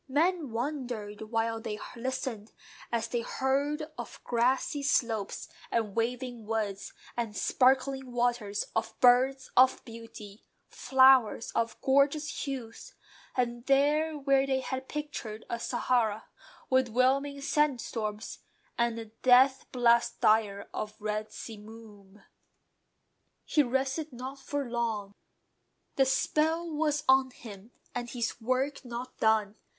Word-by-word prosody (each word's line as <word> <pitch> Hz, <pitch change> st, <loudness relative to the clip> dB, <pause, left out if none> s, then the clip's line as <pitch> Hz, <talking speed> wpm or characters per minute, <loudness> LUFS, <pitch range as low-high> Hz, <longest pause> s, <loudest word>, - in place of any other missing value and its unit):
Men 320 Hz, +2 st, +1 dB
wondered 235 Hz, -4 st, -4 dB
while 225 Hz, 0 st, -1 dB
they 210 Hz, -1 st, -4 dB, 0.2 s
listened, 240 Hz, -3 st, -4 dB, 0.4 s
as 230 Hz, -1 st, 0 dB
they 240 Hz, 0 st, -1 dB
heard 280 Hz, +5 st, -1 dB, 0.2 s
Of -, -, -7 dB
grassy 260 Hz, +6 st, +1 dB
slopes, 230 Hz, -7 st, 0 dB, 0.2 s
and 220 Hz, -4 st, -1 dB
waving 240 Hz, -1 st, -2 dB
woods, 215 Hz, -3 st, -2 dB, 0.2 s
and 230 Hz, -3 st, -3 dB
sparkling 265 Hz, 0 st, +2 dB
waters; 240 Hz, -4 st, 0 dB
Of 225 Hz, 0 st, -2 dB
birds 255 Hz, +2 st, +4 dB
of 260 Hz, +1 st, +5 dB
beauty, 225 Hz, -3 st, -11 dB, 0.3 s
flowers 260 Hz, -4 st, +4 dB
of 230 Hz, 0 st, -1 dB
gorgeous 285 Hz, +4 st, +2 dB
hues; 270 Hz, -, -7 dB, 0.4 s
And 240 Hz, -1 st, -1 dB
these 295 Hz, +3 st, +3 dB
where 275 Hz, 0 st, +3 dB
they 265 Hz, -1 st, +1 dB
had 260 Hz, 0 st, -5 dB
pictured 290 Hz, -8 st, -5 dB
a 235 Hz, -, -2 dB
Sahara, 230 Hz, -3 st, 0 dB, 0.4 s
With 260 Hz, -1 st, +3 dB
'whelming 270 Hz, +4 st, +2 dB
sandstorms, 240 Hz, -8 st, -1 dB, 0.4 s
and 235 Hz, -1 st, +1 dB
the 225 Hz, -, -5 dB, 0.2 s
death 260 Hz, +1 st, +5 dB
blast 235 Hz, -2 st, +3 dB
dire 210 Hz, -2 st, +2 dB
Of 210 Hz, 0 st, -4 dB
red 215 Hz, 0 st, -3 dB
simoom. 210 Hz, -2 st, -11 dB, 1.2 s
He 305 Hz, -, +3 dB
rested 270 Hz, +4 st, -1 dB
not 260 Hz, +3 st, -7 dB
for 280 Hz, 0 st, -3 dB
long: 225 Hz, -4 st, -2 dB, 0.8 s
The 270 Hz, -, +4 dB
spell 320 Hz, +5 st, +1 dB
was 300 Hz, -1 st, 0 dB
on 265 Hz, 0 st, +5 dB
him, 215 Hz, -4 st, -12 dB, 0.2 s
and 240 Hz, -1 st, -4 dB
his 235 Hz, -1 st, -3 dB
work 255 Hz, +5 st, -1 dB
not 245 Hz, +1 st, -7 dB
done. 220 Hz, -1 st, +2 dB
245 Hz, 120 wpm, -29 LUFS, 225-270 Hz, 1.2 s, of